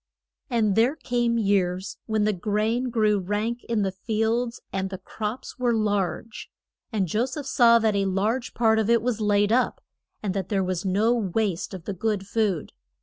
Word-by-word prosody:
And 220 -5 +2
there 240 +6 +3
came 240 -5 0
years 190 -3 0
when 220 -2 +1
the 210 0 +2
grain 215 +6 0
grew 215 -3 +2
rank 210 +5 -2
in 225 -3 0
the 190 - 0
fields, 225 +4 -1
and 190 0 -1
the 190 - -5
crops 215 +7 -6
were 240 -2 +2
large. 210 +1 -2 0.4
And 200 -5 0
Jo 220 +9 0
seph 275 +2 -6
saw 235 -3 +5
that 220 -2 +1
a 200 0 +1
large 210 +6 -1
part 220 -1 +3
of 220 0 0
it 235 -1 +4
was 235 -3 -1
laid 205 0 +2
up, 245 +2 +2 0.4
and 195 -3 -1
that 195 -2 -3
there 195 -2 +1
was 185 0 -2
no 205 +5 +2
waste 205 -3 -1
of 180 - -10
the 200 - -3
good 205 +1 -1
food. 205 -5 -1
215 Hz, 185 wpm, -25 LUFS, 195-235 Hz, 0.4 s, saw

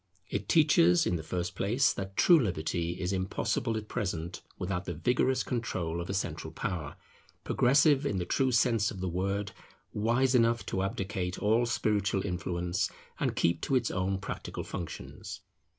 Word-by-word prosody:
It 100 0 -3
teaches 140 - +5
in 90 - +1
the 80 - -3
first 90 +2 -3
place, 120 +8 +2
that 95 0 -6
true 175 -3 +7
liberty 85 - -1
is 90 +1 -1
impossible 100 +4 -1
at 105 -1 -6
present 85 -4 -3 0.2
without 90 -1 -3
the 90 - -4
vigorous 125 - +1
control 90 -9 -2
of 85 - -7
a - - -1
central 80 -4 -3
power, 80 -3 -4 0.5
progressive 140 +2 +4
in 105 -9 -1
the 90 - -1
true 130 +5 +1
sense 115 -3 +3
of 100 - -7
the 95 - -2
word, 100 +3 -1 0.4
wise 120 +5 +2
enough 115 -1 +3
to 95 - -2
abdicate 95 -1 -2
all 115 +3 +2
spiritual 105 -3 0
influence, 90 0 -1 0.3
and - - 0
keep 85 - +1
to 135 - 0
its 120 -3 +1
own 95 +1 0
practical 95 - -5
functions. 85 -3 -7
95 Hz, 165 wpm, -30 LUFS, 90-115 Hz, 0.5 s, true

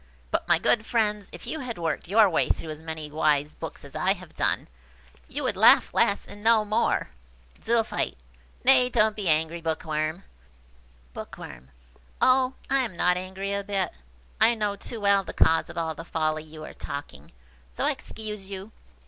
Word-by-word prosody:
But, - - -1
my - - +5
good 220 - +2
friends, 210 -3 0
if - - -10
you 315 - -3
had 250 -4 -5
worked 165 -1 -2
your 210 +3 +6
way 170 - +1
through 160 - -2
as 155 0 -8
many 160 -2 -6
wise 150 -1 +1
books 160 -3 -8
as 140 - -13
I 190 +1 +2
have 180 -4 -13
done, - - 0 0.6
you - - -4
would - - 0
laugh - - +6
less 200 - +2
and 205 +1 -11
know 225 -1 +5
more." 215 +3 0 0.5
Zoophyte. 230 -1 0 0.5
"Nay, 255 -1 +6
don't 215 -3 +2
be 200 -5 -2
angry, 160 +2 +1
Bookworm." 160 +1 -2 0.9
Bookworm. 65 +1 -9 0.5
"Oh, 255 0 +3
I 275 - +2
am 230 -9 -2
not 180 +1 +3
angry 190 +2 -4
a 200 0 -1
bit. 195 -3 -1 0.5
I 230 +2 +5
know 210 -2 -1
too 225 +3 -6
well 200 -1 +3
the - - -7
cause 165 - +3
of - - -9
all 165 -1 -1
the 165 - -8
folly 155 -2 -1
you 155 0 -11
are - - -9
talking, 140 -1 -8 0.4
so 60 - -2
I - - +3
excuse 210 -3 -6
you. 195 +2 -7
190 Hz, 180 wpm, -26 LUFS, 160-215 Hz, 0.9 s, your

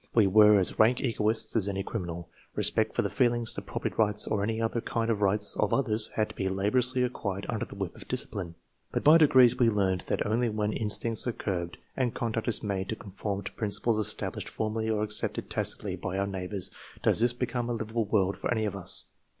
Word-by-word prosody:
We 110 -3 +6
were 105 +2 +6
as 95 - +1
rank 120 +3 +5
egoists 110 -3 +1
as 100 -3 +3
any 95 0 -2
criminal. 85 -5 -5 0.3
Respect - - +2
for - - +1
the - - -1
feelings, 120 -3 +2
the - - -3
property - - -4
rights, 105 -1 +2
or 105 - -1
any 110 +2 -1
other 115 +1 -1
kind 115 0 -1
of 105 -2 -2
rights, 105 +1 +1
of 105 - 0
others 110 -5 +1
had 110 -1 0
to - - -11
be 95 - -1
laboriously 125 +7 +1
acquired 100 -5 -3
under 110 -3 -2
the - - -11
whip 95 -3 -5
of - - -11
discipline. 85 -4 -2 0.4
But - - -2
by 155 +3 +7
degrees 130 -5 +5
we 120 -2 +5
learned 95 -4 +1
that - - -1
only 115 +3 +1
when 105 0 -1
in 110 - -2
stincts 115 +3 +1
arc 120 - -3
curbed, 85 -3 -3 0.2
and 125 -3 -1
conduct 115 -2 -2
is 115 - 0
made 95 -2 -2
to 110 - -2
conform 100 0 -5
to 100 - -5
principles 110 +1 0
established 105 - 0
formally 110 0 -2
or 105 -1 0
accepted 105 0 -2
tacitly - - -2
by 95 - -4
our 100 - 0
neighbors, 95 -1 -3 0.3
does - - +4
this 120 +1 +4
become 120 -1 -3
a - - 0
livable 115 0 -2
world 100 -2 +1
for - - -3
any 110 -2 +1
of 105 - -3
us. 95 -3 -2
110 Hz, 220 wpm, -28 LUFS, 100-115 Hz, 0.4 s, by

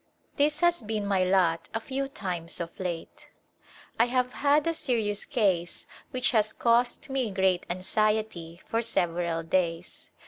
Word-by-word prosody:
This 300 +2 +1
has 345 -2 +3
been 215 -1 -3
my 195 -2 +2
lot 180 -3 +2
a - - +1
few 270 +4 -3
times 180 -10 -4
of 170 -1 -6
late. 175 -3 -5 0.7
I 230 - +6
have 250 0 0
had 290 +1 +3
a 330 - +1
serious 220 -9 0
case 190 - 0 0.2
which 255 -1 0
has 215 -2 +2
caused 240 +3 +1
me 260 -4 0
great 190 -2 +1
anxiety 185 -2 -1
for 230 - 0
several 170 -6 0
days. 170 0 -2
210 Hz, 145 wpm, -28 LUFS, 175-250 Hz, 0.7 s, I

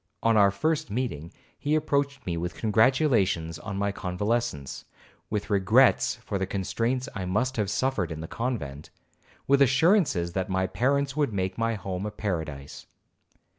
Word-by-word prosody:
On 115 -1 +4
our 100 -2 +6
first 155 +8 -1
meeting 100 - -3 0.3
he 150 +2 +1
approached 140 -3 0
me 85 - -2
with 85 +2 -4
congratulations 110 - +2
on 105 -2 -5
my 100 0 0
convalescence, 100 - -2 0.5
with 105 0 -3
regrets 95 -3 +4
for 100 - -2
the 95 - -1
constraints 115 +7 -1
I 95 -2 -4
must 125 +8 0
have 105 -3 0
suffered 105 - 0
in 80 - -5
the 80 - -6
convent, 80 - -4 0.6
with 140 0 +3
assurances 135 - +3
that 95 +1 -2
my 95 0 +1
parents 140 +6 0
would 145 -7 0
make 95 -1 -1
my 115 0 0
home 95 0 -4
a - - -5
paradise. 80 -10 -5
105 Hz, 155 wpm, -27 LUFS, 90-130 Hz, 0.6 s, our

